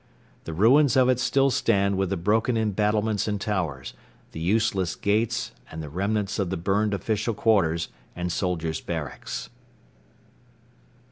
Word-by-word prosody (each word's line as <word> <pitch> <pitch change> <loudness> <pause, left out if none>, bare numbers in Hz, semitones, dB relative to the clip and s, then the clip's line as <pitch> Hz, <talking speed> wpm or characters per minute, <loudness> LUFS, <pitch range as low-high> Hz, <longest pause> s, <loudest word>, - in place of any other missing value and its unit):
The 80 - -5
ruins 125 - +4
of 130 -1 +5
it 130 -1 +2
still 135 +2 +2
stand 100 -6 +2
with 95 -1 0
the 100 - -1
broken 110 +7 +1
embattlements 105 0 0
and 105 -1 -1
towers, 85 -11 -3 0.4
the - - -7
useless 95 0 +1
gates 115 +3 0 0.2
and 80 0 -7
the 75 - -7
remnants 100 +5 -1
of 95 -3 0
the 95 - -2
burned 100 +4 +1
official 110 +2 -1
quarters 85 -8 +2 0.3
and 90 0 -3
soldiers' 85 -3 -2
barracks. - - -5
105 Hz, 140 wpm, -25 LUFS, 90-110 Hz, 0.4 s, of